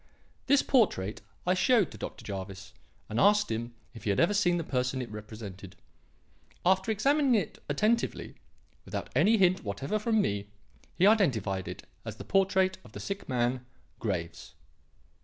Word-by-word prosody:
This 280 +1 +5
portrait 110 - +1 0.2
I 180 - +3
showed 205 - +3
to - - -10
Dr. - - -7
Jervis 95 0 -7 0.3
and 110 - -2
asked 210 +1 +4
him 120 +1 -4 0.2
if 115 -3 -11
he - - -1
had 100 - +1
ever 175 +5 +4
seen 175 -4 +2
the 170 - -2
person 125 -2 -1
it 125 -4 -5
represented. 105 -3 -9 0.9
After 190 +3 +3
examining 270 +4 +3
it 195 -8 -2
attentively, 215 +11 0 0.5
without - - -5
any 225 +2 +5
hint 185 -2 +3
whatever 120 - -2
from 220 +1 +1
me, 100 - -1 0.5
he 185 - +3
identified 120 - +2
it - - -7 0.2
as - - -6
the - - -9
portrait 190 -1 +2
of - - -16
the - - -7
sick 195 -5 -5
man, 125 0 0 0.4
Graves." 85 -5 -4
145 Hz, 160 wpm, -29 LUFS, -, 0.9 s, This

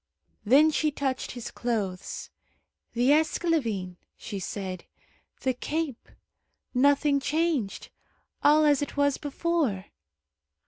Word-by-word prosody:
Then 285 +8 +6
she 310 0 +1
touched 275 -2 -3
his 245 -3 -7
clothes. 205 -7 -3 0.6
"The 245 +3 +3
esclavine," 280 - +1 0.2
she 205 -3 -6
said, 185 -1 -5 0.6
"the 260 - +1
cape. 295 0 -4 0.6
Nothing 280 +2 +3
changed; 295 -8 -1 0.5
all 305 +1 +5
as 290 -2 +4
it 290 - -4
was 285 -1 +2
before." 290 - -1
275 Hz, 100 wpm, -27 LUFS, 225-300 Hz, 0.6 s, Then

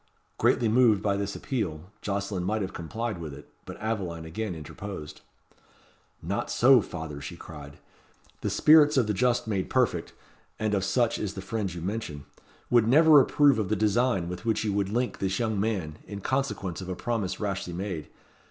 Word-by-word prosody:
Greatly 120 - +3
moved 110 -3 +4
by 100 -1 +2
this 100 0 -3
appeal, 95 - -4
Jocelyn 100 -2 -2
might 105 +3 0
have 95 - -5
complied 110 +4 -4
with 75 -4 -6
it, 75 - -14
but - - -8
Aveline 95 -7 -3
again 90 +3 -4
interposed. 80 0 -8 1.0
"Not - - -2
so, 130 0 +6
father," 80 -6 -7
she 80 +5 -7
cried. 70 -4 -10 0.6
"The - - -1
spirits 150 -2 +6
of 125 - +4
the 105 - 0
just 125 +3 +1
made 100 -4 -1
perfect 115 -10 +1 0.4
and 110 -1 -1
of 100 -2 +1
such 120 +4 +1
is 100 -2 -3
the - - -5
friend 105 -4 -2
you 85 -1 -7
mention 90 -7 -4 0.5
would 120 -2 +5
never 150 +3 +7
approve 140 -3 +4
of 105 - -1
the 110 - +2
design 110 -2 +1
with 90 +2 -6
which 110 -2 0
you 105 -2 0
would 100 -1 0
link 120 +4 -1
this 95 0 -1
young 110 -4 -1
man, 95 -8 -2
in 100 -1 -6
consequence 100 -8 -2
of 95 - -7
a 90 - -2
promise 110 -2 -2
rashly 100 -4 -3
made. 90 -3 -4
100 Hz, 180 wpm, -27 LUFS, 90-115 Hz, 1.0 s, never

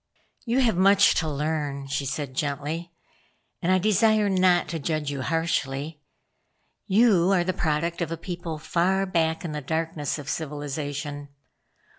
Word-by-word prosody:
"You 245 +3 +2
have 225 -8 +2
much 200 +2 +6
to 160 -2 -1
learn," 145 -1 -2
she 140 0 -2
said 135 0 -4
gently, 150 +5 -3 0.7
"and 180 - +1
I 185 - +5
desire 215 +2 +3
not 185 -2 +3
to 165 - -3
judge 155 -1 -2
you 140 -2 -4
harshly. 150 -1 -2 0.9
You 195 -4 +4
are 180 -3 +3
the 185 +1 -1
product 165 +2 -1
of 165 -1 -2
a 165 - -3
people 170 -2 -5
far 185 +5 +1
back 165 -2 0
in 165 - -3
the 150 0 -4
darkness 160 0 -2
of 145 -3 -9
civilization. 145 -1 -4
160 Hz, 150 wpm, -25 LUFS, 145-185 Hz, 0.9 s, much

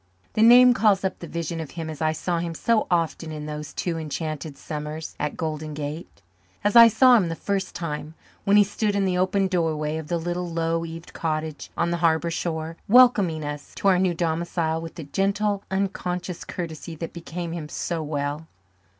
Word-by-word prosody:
The 215 - +1
name 245 +2 +8
calls 210 -5 +3
up 190 - -2
the 170 - -7
vision 165 0 -4
of 160 -3 -5
him 165 -1 -3
as 155 -1 -7
I 155 0 +2
saw 170 +2 -2
him 170 -1 -3
so 230 +5 +1
often 165 -2 0
in 150 -1 -6
those 150 0 -6
two 170 -2 -2
enchanted 155 -1 -4
summers 150 +1 -6
at 150 - -2
Golden 155 -2 -4
Gate; 150 - -6 0.4
as 205 +2 +1
I 230 0 +11
saw 245 +3 +6
him 185 -6 +1
the 165 - -3
first 195 +2 -2
time, 155 -1 -5 0.3
when 200 +1 +4
he 205 - +8
stood 205 +1 -1
in 200 -1 +2
the 180 -1 +1
open 190 +1 +2
doorway 160 -4 0
of 160 -1 -6
the 170 - 0
little 175 +1 -3
low 165 0 0
eaved 165 0 -9
cottage 155 -1 -3
on 170 - +1
the 170 - 0
harbour 165 0 +2
shore, 165 -1 -3
welcoming 205 -10 +5
us 145 0 -7
to 200 - +2
our 185 -2 +4
new 180 -2 +1
domicile 165 -1 -1
with 165 0 -8
the 165 - -7
gentle, 200 +6 0
unconscious 180 -2 -3
courtesy 165 -1 -6
that 165 +1 -6
became 170 0 -6
him 165 -3 -5
so 170 +1 -3
well. 150 +1 -3
165 Hz, 195 wpm, -24 LUFS, 155-185 Hz, 0.4 s, I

